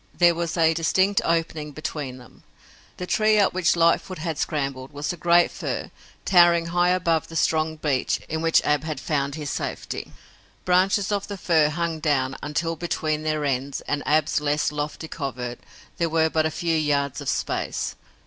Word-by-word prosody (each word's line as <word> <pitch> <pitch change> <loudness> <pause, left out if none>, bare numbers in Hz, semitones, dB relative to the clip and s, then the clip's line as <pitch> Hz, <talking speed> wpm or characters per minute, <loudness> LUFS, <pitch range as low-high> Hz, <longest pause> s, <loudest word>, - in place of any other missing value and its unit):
There 175 -1 +5
was 170 0 -3
a 165 -1 +4
distinct 190 +5 +2
opening 160 -3 -1
between 145 -3 -5
them. 125 -2 -16 0.6
The 180 - -4
tree 215 +3 +3
up 200 - +3
which 180 -2 +2
Lightfoot 170 +2 +2
had 160 -2 -4
scrambled 135 -4 -2
was 145 +3 -3
a - - -6
great 175 +1 +4
fir - - -4 0.3
towering 175 -2 +5
high 175 0 +3
above 170 -4 +1
the 165 - -10
strong 160 0 +1
beech 145 -4 0
in 160 0 -3
which 165 0 +3
Ab 150 0 +1
had 155 -3 -4
found 140 -1 -1
his 150 -3 -4
safety. - - -5 0.5
Branches 190 +3 +2
of 200 -1 -1
the 200 - -6
fir 160 -5 +3
hung 165 +1 -2
down 135 -4 0
until 165 +3 -2
between 155 -3 -2
their 155 -1 -1
ends 135 0 -2
and 145 0 -2
Ab's 150 0 +2
less 150 0 0
lofty 150 +2 -4
covert 125 -6 -5 0.4
there 170 -1 +1
were 160 0 +2
but 160 0 +2
a - - -2
few 165 +1 -1
yards 145 -2 0
of 140 - -3
space. - - -2
160 Hz, 175 wpm, -24 LUFS, 145-170 Hz, 0.6 s, There